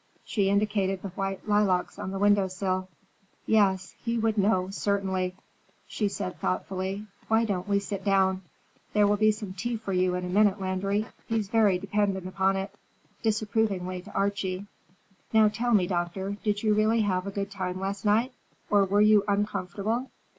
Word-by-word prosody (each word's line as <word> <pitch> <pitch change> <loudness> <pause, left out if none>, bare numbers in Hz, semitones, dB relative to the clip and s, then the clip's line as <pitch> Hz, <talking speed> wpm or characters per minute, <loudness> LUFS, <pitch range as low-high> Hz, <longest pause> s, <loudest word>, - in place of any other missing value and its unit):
She 200 -3 +1
indicated 200 -2 +1
the 200 - -4
white 195 +2 -4
lilacs 205 -3 +1
on - - -4
the 195 - -4
window 205 -1 +4
sill. 185 0 -2 0.6
"Yes, 195 -4 +2
he 235 0 -1
would 225 -1 +1
know, 195 -2 +2
certainly," 190 -2 -1 0.5
she 210 - -1
said 195 -2 -4
thoughtfully. 190 +2 -2 0.2
"Why 225 +1 +3
don't 190 -4 -2
we 200 -1 +2
sit 200 -1 -4
down? 190 -1 +2 0.5
There 210 -1 +4
will 205 +1 +3
be 215 +1 +4
some 210 -3 -3
tea 230 +5 -3
for 215 -3 -5
you 180 0 +2
in 180 0 -3
a - - -3
minute, 205 +2 +3
Landry. 195 +2 -1 0.2
He's 220 -4 -1
very 210 -4 +4
dependent 195 -1 -1
upon 190 +1 +1
it," 195 +1 -4 0.5
disapprovingly 210 -4 0
to - - -13
Archie. 200 -1 -1 0.7
"Now 220 -1 +6
tell 235 +2 +1
me, 190 -3 +4
Doctor, 180 +2 -2
did 205 -1 0
you 215 -1 +3
really 215 +2 +3
have 185 -2 0
a - - -3
good 200 0 -4
time 185 -2 -3
last 195 +1 -3
night, 220 +4 +2 0.4
or 200 -1 +5
were 200 +2 +2
you 210 -1 +6
uncomfortable? 205 +4 -1
200 Hz, 170 wpm, -27 LUFS, 190-210 Hz, 0.7 s, Now